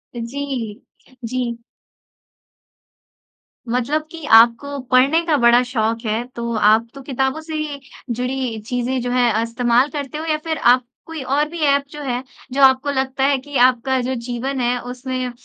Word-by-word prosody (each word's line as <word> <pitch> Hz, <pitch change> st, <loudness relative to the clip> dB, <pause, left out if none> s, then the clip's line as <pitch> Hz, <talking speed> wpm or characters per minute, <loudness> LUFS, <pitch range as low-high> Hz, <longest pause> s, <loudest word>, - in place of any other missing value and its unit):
जी, 240 Hz, -2 st, -5 dB, 0.4 s
जी। 240 Hz, 0 st, -2 dB, 2.1 s
मतलब 255 Hz, +6 st, 0 dB
कि 330 Hz, -1 st, -9 dB
आपको 240 Hz, +5 st, +3 dB
पढ़ने 270 Hz, +6 st, +4 dB
का 320 Hz, -3 st, +2 dB
बड़ा 240 Hz, 0 st, +5 dB
शौक़ 230 Hz, -2 st, -2 dB
है 220 Hz, +2 st, 0 dB
तो 235 Hz, 0 st, -3 dB
आप 215 Hz, +2 st, +4 dB
तो 275 Hz, -, -10 dB
किताबों 265 Hz, +2 st, -1 dB
से 315 Hz, 0 st, -8 dB
ही 300 Hz, -2 st, -3 dB, 0.3 s
जुड़ी 250 Hz, -1 st, -2 dB
चीज़ें 250 Hz, +1 st, -1 dB
जो 245 Hz, 0 st, -3 dB
हैं 235 Hz, -3 st, +2 dB
इस्तेमाल 240 Hz, +3 st, +2 dB
करते 290 Hz, -1 st, -5 dB
हो 315 Hz, -, -5 dB
या 310 Hz, -1 st, +1 dB
फिर 320 Hz, -1 st, -2 dB
आप 250 Hz, +1 st, +4 dB, 0.2 s
कोई 325 Hz, -2 st, -7 dB
और 280 Hz, +3 st, +1 dB
भी 340 Hz, -, -7 dB
ऐप 280 Hz, 0 st, +3 dB
जो 295 Hz, -, -8 dB
है 250 Hz, -2 st, -2 dB, 0.3 s
जो 275 Hz, -, 0 dB
आपको 265 Hz, +2 st, +5 dB
लगता 265 Hz, 0 st, -1 dB
है 275 Hz, 0 st, +3 dB
कि 285 Hz, +1 st, -5 dB
आपका 255 Hz, +1 st, +1 dB
जो 255 Hz, +2 st, -2 dB
जीवन 255 Hz, +3 st, -3 dB
है 245 Hz, +1 st, +1 dB
उसमें 255 Hz, 0 st, -4 dB
255 Hz, 165 wpm, -20 LUFS, 240-280 Hz, 2.1 s, बड़ा